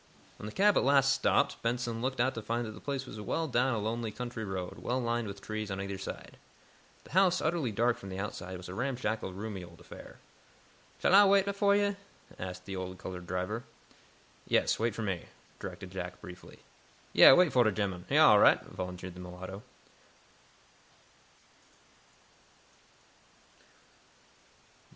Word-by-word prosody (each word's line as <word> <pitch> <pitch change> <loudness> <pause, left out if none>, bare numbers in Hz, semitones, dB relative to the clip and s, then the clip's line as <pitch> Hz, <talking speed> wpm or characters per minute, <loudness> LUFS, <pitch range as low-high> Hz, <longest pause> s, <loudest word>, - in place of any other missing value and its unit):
When 105 - -7
the - - -6
cab 205 - +4
at - - +3
last 135 0 +4
stopped, 140 +1 +1
Benson 115 -1 -2
looked 130 +1 -2
out 130 +2 +2
to 115 - -5
find 115 +2 -2
that 110 - -6
the 105 - -11
place 140 -2 -4
was 110 -4 -8
well 160 +10 -1
down 125 -1 +1
a - - -1
lonely 110 +1 -2
country 120 0 -5
road, 95 -3 -5
well 125 +1 -1
lined 120 -2 -1
with 100 0 -8
trees 110 -1 -4
on 95 0 -4
either 100 0 -4
side. 95 - -8 0.7
The - - -16
house, 185 -1 +4
utterly 155 -7 0
dark 115 +3 +1
from 95 - -9
the 95 - -6
outside, 95 -2 -5
was 90 - -10
a 90 - -7
ramshackle, 115 -3 -2
roomy 100 0 -6
old 85 -1 -14
affair. - - -12 0.8
"Shall - - +2
Ah 200 +1 +8
wait 200 0 +3
fo' 200 0 +3
yo'?" 205 0 +2 0.4
asked 90 0 -6
the 95 - -5
old 95 0 -5
colored 90 -1 -7
driver. 90 +6 -3 0.8
"Yes, - - +2
wait 115 -1 0
for 115 - -3
me," 95 -5 -3 0.3
directed 90 - -8
Jack, 90 -1 -6
briefly. 90 0 -12 0.5
"Yeah; - - +10
wait 180 -1 +4
fo' 125 - +5
de 110 -2 +4
gemmun. 95 -3 -3
He's - - +2
all - - +8
right," - - +6
volunteered 90 0 -7
the 90 - -12
mulatto. 90 +2 -8
110 Hz, 165 wpm, -31 LUFS, 95-130 Hz, 0.8 s, Yeah